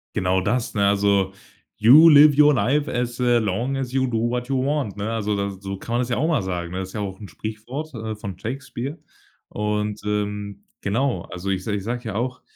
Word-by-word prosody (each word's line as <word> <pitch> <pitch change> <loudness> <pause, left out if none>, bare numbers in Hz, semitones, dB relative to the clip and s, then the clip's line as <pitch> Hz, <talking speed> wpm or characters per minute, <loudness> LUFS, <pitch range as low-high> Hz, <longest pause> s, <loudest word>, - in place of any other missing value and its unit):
Genau 95 0 +1
das, 120 +5 -1
ne, 100 -2 +2
also: 100 -1 +2 0.4
„You 150 +9 +8
live 145 -1 +7
your 150 0 +7
life 140 +3 +1
as, 120 0 -2
äh, 120 -1 +3
long 115 +6 -1
as 130 -1 -4
you 130 -1 +2
do 115 -1 0
what 125 0 -2
you 135 - +1
want“, 140 -6 -1
ne? 105 +2 -3
Also 105 -2 -1
das 100 -1 -2
so 95 0 -4
kann 115 - -6
man 120 - +2
das 125 - -3
ja 120 - 0
auch 155 - +1
mal 155 -10 +2
sagen, 90 -2 -4
ne? 95 - -3
Das 95 0 -5
ist - - -14
ja 105 - -4
auch 95 -1 -5
'n 100 - -9
Sprichwort, 120 +8 -6
äh, 110 -2 -5
von 100 -3 -7
Shakespeare. 130 - -5 0.5
Und, 105 0 -2
ähm, 105 -1 -3 0.2
genau, 115 0 0
also 90 +3 -5
ich 95 -1 -1
se 105 - -2
ich 100 -2 -2
sag 120 +2 -3
ja 110 -3 -5
auch: 125 +3 -2
110 Hz, 230 wpm, -23 LUFS, 100-130 Hz, 0.5 s, You